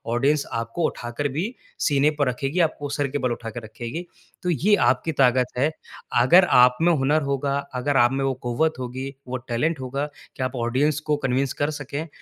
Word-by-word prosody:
Audience 140 +4 +2 0.2
आपको 115 +9 -2
उठाकर 120 +3 -3
भी 175 +6 0 0.4
सीने 145 0 +3
पर 145 - +3
रखेगी, 135 +7 -2
आपको 155 -3 0
सिर 145 -1 +1
के 140 +2 -3
बल 125 -3 -1
उठा 115 -1 -4
के 115 - -6
रखेगी। 120 +10 -6 0.4
तो 180 - 0
ये 180 +6 +3
आपकी 165 - 0
ताकत 125 -1 +3
है। 140 +5 +3 0.5
अगर 175 +9 +7 0.2
आप 125 0 +5
में 175 +1 +5
हुनर 150 +1 +2
होगा, 140 0 -1 0.2
अगर 130 +2 0
आप 120 -1 +5
में 135 +1 -1
वो 135 - +1
क़ुव्वत 140 +7 +1
होगी, 130 +2 -4 0.2
वो 130 +1 -3
टैलेंट 130 +6 -1
होगा 135 +2 -3 0.3
कि 130 - -3
आप 130 +1 -3
ऑडियंस 130 +5 +1
को 150 - +3
कन्विन्स 130 +1 0
कर 145 - +2
सकें, 145 +3 -5
135 Hz, 195 wpm, -24 LUFS, 125-150 Hz, 0.5 s, अगर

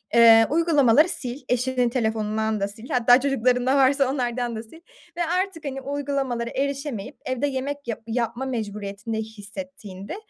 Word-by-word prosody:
eee, 225 -1 +8
uygulamaları 305 -2 +4
sil. 250 0 -5
Eşinin 250 0 +1
telefonundan 220 -2 -1
da 200 - 0
sil. 225 +3 -12
Hatta 245 -1 +5
çocuklarında 255 -1 +2
varsa 270 0 +3
onlardan 245 -3 -2
da 220 - -5
sil 325 - -15 0.4
ve 345 - +1 0.2
artık, 375 -5 -6
hani, 270 -1 -4
uygulamalara 270 -4 -2
erişemeyip 275 -3 -3
evde 260 +2 -1
yemek 280 0 -4
yap 230 -1 -4
yapma 235 +2 -2
mecburiyetinde 210 -3 -4
hissettiğinde 215 - -8
250 Hz, 140 wpm, -24 LUFS, 225-275 Hz, 0.4 s, eee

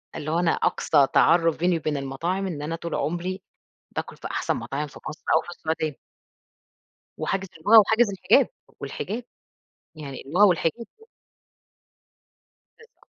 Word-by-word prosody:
اللي 155 +1 -4
هو 170 - +1
أنا 170 -2 +2
أقصى 145 -3 +2
تعرُّف 165 0 +4
بيني 175 0 +2
وبين 150 -1 -2
المطاعم 165 +8 -2
إن 155 -6 -5
أنا 160 +2 -3
طول 165 0 -5
عُمري 180 +4 -2 0.5
باكُل - - -5
في - - -7
أحسن - - -1
مطاعم 150 +2 -4
في - - -13
مصر 155 - -10
أو 160 - +4
في - - -12
السعودية. 160 -4 -3 1.2
وحاجز 195 0 -2
اللغة 210 +8 +7
وحاجز 220 +2 +3
الحِجاب، 195 - +3 0.3
والحِجاب، 230 +5 -4 0.7
يعني 140 -4 -8
اللغة 180 +8 +5
والحِجاب. 180 +5 +1 1.9
بالضبط. 455 +2 -21
165 Hz, 135 wpm, -25 LUFS, 155-190 Hz, 1.9 s, اللغة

